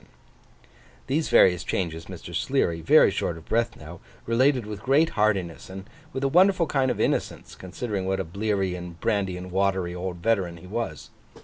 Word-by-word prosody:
These 150 +4 -1
various 90 -1 +5
changes, 80 -3 -3
Mr. - - -9
Sleary, 85 -1 0
very 80 - +5
short 85 - -2
of 80 - -13
breath 115 +1 0
now, 80 +3 -11 0.3
related 125 +1 +2
with 105 -1 -7
great 145 +7 +3
heartiness, 100 -7 -1
and 95 +1 -9 0.2
with 135 -3 -4
a - - +3
wonderful 180 +4 +4
kind 135 -3 +1
of - - -2
innocence, - - -1
considering 95 +1 -5
what 95 0 0
a - - 0
bleary 95 +1 -1
and 90 -1 -8
brandy 95 -3 -1
and 90 0 -8
watery 95 -2 0
old 90 0 -5
veteran 90 -2 0
he 85 - -14
was. 100 -6 -5
95 Hz, 175 wpm, -25 LUFS, 90-115 Hz, 0.3 s, various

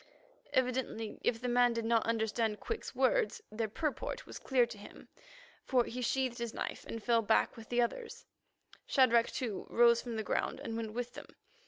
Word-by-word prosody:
Evidently, 250 -4 -1
if 230 - +1
the 250 - -3
man 245 0 +4
did 230 -1 -2
not 230 -1 +3
understand 220 -1 0
Quick's 455 - -5
words, - - +2
their 220 +1 -1
purport 300 +8 -3
was - - -8
clear 255 -2 +3
to 235 -3 -10
him, 205 - -13 0.5
for 250 -2 +3
he 250 +2 -5
sheathed 255 0 0
his 235 -1 -4
knife - - -4
and 225 -1 -6
fell 235 -1 +3
back 220 0 +2
with 225 -1 -11
the 240 0 +3
others. 455 - -5 0.6
Shadrach, 235 -4 +4
too, 230 -6 -4
rose 235 0 +5
from 235 -2 -5
the 220 - -2
ground - - -1
and 225 - -5
went 225 -1 -4
with 245 +1 -4
them. - - -9
235 Hz, 185 wpm, -33 LUFS, 225-250 Hz, 0.6 s, rose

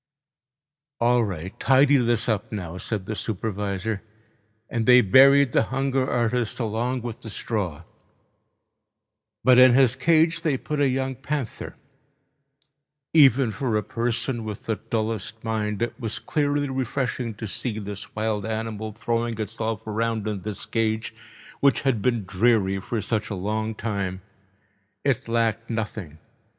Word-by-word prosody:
"All 120 0 +3
right, 95 -3 -4
tidy 140 +1 +5
this 120 -3 +1
up 105 -3 -1
now," 90 -4 -5
said 105 -2 -4
the 110 - -4
supervisor. 105 0 -3 0.7
And 115 -2 -2
they 125 0 +8
buried 135 +5 +6
the - - +4
hunger 135 0 0
artist 120 0 0
along 120 +2 -1
with 120 -2 -6
the 110 - -7
straw. 95 -8 -3 1.6
But 125 -1 +6
in 125 -1 +8
his 130 -2 +5
cage 160 +4 +3
they 155 -6 +1
put 150 +3 -4
a 145 - +4
young 130 +1 -1
panther. 140 -1 -5 1.4
Even 135 -6 +6
for 115 -2 -1
a 105 - -1
person 120 +1 -2
with 105 -2 -6
the 110 -2 -2
dullest 110 0 -3
mind 110 -1 -1
it 120 - -2
was 115 -3 -4
clearly 145 -1 0
refreshing 130 -3 -2
to 110 - -6
see 110 +3 -2
this 105 -1 -7
wild 110 -1 -1
animal 110 -1 -4
throwing 115 0 -2
itself 110 -1 -3
around 110 0 -1
in 105 -3 -3
this 105 0 -4
cage, 110 -1 -1 0.5
which 140 -1 +3
had 130 -6 +1
been 120 -3 0
dreary 95 0 +2
for 110 +2 -3
such 110 -1 -1
a 100 - -3
long 110 +3 -2
time. 100 -4 -3 0.8
It 135 -2 +1
lacked 115 -1 0
nothing. 110 -8 -4
115 Hz, 140 wpm, -24 LUFS, 105-125 Hz, 1.6 s, they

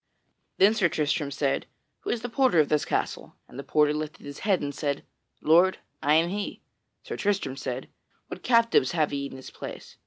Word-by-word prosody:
Then 200 +3 +6
Sir 195 -6 +2
Tristram 150 -1 0
said, 140 -1 -1 0.3
"Who - - -6
is 235 - -1
the - - -1
porter 240 -7 +3
of 150 - +4
this 150 -1 +2
castle?" - - -2
And 130 - -11
the - - -5
porter 150 0 +3
lifted 155 -1 -5
his 145 0 -8
hand 195 -5 +1
and 145 0 -3
said, 140 -1 -2 0.4
"Lord, 175 +4 +5 0.2
I 150 +2 +4
am 165 +2 +3
he." 200 +2 -4 0.4
Sir - - -5
Tristram 195 -10 -1
said, 130 -1 -4 0.4
"What - - -8
captives 230 - +3
have 155 -4 +1
ye 140 0 -2
in 130 - -10
this 130 - -10
place?" - - -9
155 Hz, 195 wpm, -27 LUFS, 145-195 Hz, 0.4 s, Then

